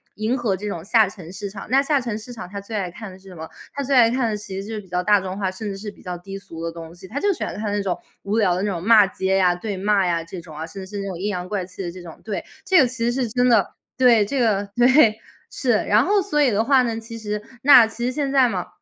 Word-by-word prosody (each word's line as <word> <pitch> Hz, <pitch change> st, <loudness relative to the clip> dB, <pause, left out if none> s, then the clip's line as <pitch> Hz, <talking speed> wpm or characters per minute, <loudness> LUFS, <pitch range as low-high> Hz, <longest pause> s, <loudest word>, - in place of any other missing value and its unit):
迎 220 Hz, +5 st, -1 dB
合 220 Hz, -6 st, -1 dB
这 210 Hz, +3 st, -6 dB
种 170 Hz, -5 st, -5 dB
下 220 Hz, +1 st, +4 dB
沉 185 Hz, -4 st, -10 dB
市 195 Hz, +2 st, -6 dB
场。 195 Hz, 0 st, -9 dB
那 270 Hz, +1 st, +5 dB
下 285 Hz, 0 st, +1 dB
沉 235 Hz, -4 st, -3 dB
市 225 Hz, +3 st, -9 dB
场， 220 Hz, -6 st, -8 dB
它 200 Hz, -, -5 dB
最 200 Hz, +3 st, -7 dB
爱 190 Hz, -4 st, -2 dB
看 215 Hz, +3 st, -9 dB
的 185 Hz, -, -13 dB
是 190 Hz, 0 st, -16 dB
什 185 Hz, -, -11 dB
么？ 160 Hz, -1 st, -7 dB, 0.3 s
它 280 Hz, -, -3 dB
最 275 Hz, +1 st, 0 dB
爱 235 Hz, -3 st, +6 dB
看 245 Hz, -2 st, 0 dB
的 215 Hz, -, -1 dB
其 200 Hz, -2 st, -6 dB
实 200 Hz, -, -9 dB
就 225 Hz, -, -6 dB
是 210 Hz, -, -5 dB
比 195 Hz, -, -19 dB
较 180 Hz, 0 st, 0 dB
大 205 Hz, +3 st, +4 dB
众 190 Hz, 0 st, -5 dB
化， 195 Hz, -2 st, -1 dB
甚 205 Hz, +3 st, -6 dB
至 195 Hz, -, -5 dB
是 210 Hz, +2 st, -6 dB
比 -, -, -19 dB
较 180 Hz, -1 st, -5 dB
低 195 Hz, +3 st, -8 dB
俗 165 Hz, -4 st, -10 dB
的 165 Hz, -, -2 dB
东 165 Hz, 0 st, -10 dB
西， 180 Hz, +2 st, -13 dB
它 280 Hz, -, -4 dB
就 405 Hz, -, +3 dB
喜 -, -, -11 dB
欢 -, -, -4 dB
看 210 Hz, 0 st, -3 dB
那 205 Hz, 0 st, 0 dB
种 190 Hz, -3 st, -2 dB, 0.3 s
无 205 Hz, +2 st, -1 dB
聊 200 Hz, -5 st, +3 dB
的 185 Hz, -, -2 dB
那 205 Hz, -, 0 dB
种 175 Hz, -4 st, -4 dB
骂 215 Hz, -1 st, +6 dB
街 190 Hz, 0 st, 0 dB
呀、 180 Hz, -2 st, +3 dB
对 200 Hz, +2 st, -5 dB
骂 200 Hz, 0 st, +2 dB
呀 170 Hz, -2 st, 0 dB
这 170 Hz, +2 st, -8 dB
种 160 Hz, -2 st, -13 dB
啊， 160 Hz, -, -4 dB
甚 190 Hz, +4 st, -8 dB
至 190 Hz, -, -15 dB
是 -, -, -3 dB
那 200 Hz, -, -5 dB
种 185 Hz, -3 st, -5 dB
阴 190 Hz, +4 st, -3 dB
阳 180 Hz, -3 st, -4 dB
怪 200 Hz, -1 st, -2 dB
气 185 Hz, +2 st, -10 dB
的 175 Hz, -, -3 dB
这 180 Hz, +1 st, -10 dB
种。 165 Hz, -2 st, -11 dB
对， 215 Hz, -2 st, -3 dB, 0.2 s
这 370 Hz, -4 st, +5 dB
个 -, -, +5 dB
其 240 Hz, -1 st, -3 dB
实 -, -, +1 dB
是 235 Hz, -, -3 dB
真 245 Hz, +3 st, +2 dB
的 230 Hz, -5 st, +3 dB, 0.3 s
对， 240 Hz, -5 st, +5 dB
这 270 Hz, +6 st, -2 dB
个 205 Hz, -3 st, +1 dB
对， 240 Hz, -3 st, +5 dB, 0.3 s
是， 255 Hz, -, 0 dB, 0.2 s
然 210 Hz, +5 st, +4 dB
后 405 Hz, 0 st, +3 dB
所 360 Hz, -6 st, 0 dB
以 270 Hz, -4 st, +4 dB
的 215 Hz, +2 st, +1 dB
话 270 Hz, -1 st, +5 dB
呢， 230 Hz, -2 st, -2 dB
其 230 Hz, 0 st, -9 dB
实 210 Hz, -1 st, -4 dB, 0.2 s
那 255 Hz, -5 st, +8 dB
其 235 Hz, +2 st, -5 dB
实 250 Hz, -, 0 dB
现 280 Hz, 0 st, -2 dB
在 265 Hz, -3 st, +4 dB
嘛， 185 Hz, -5 st, -3 dB
210 Hz, 340 characters per minute, -22 LUFS, 190-235 Hz, 0.3 s, 那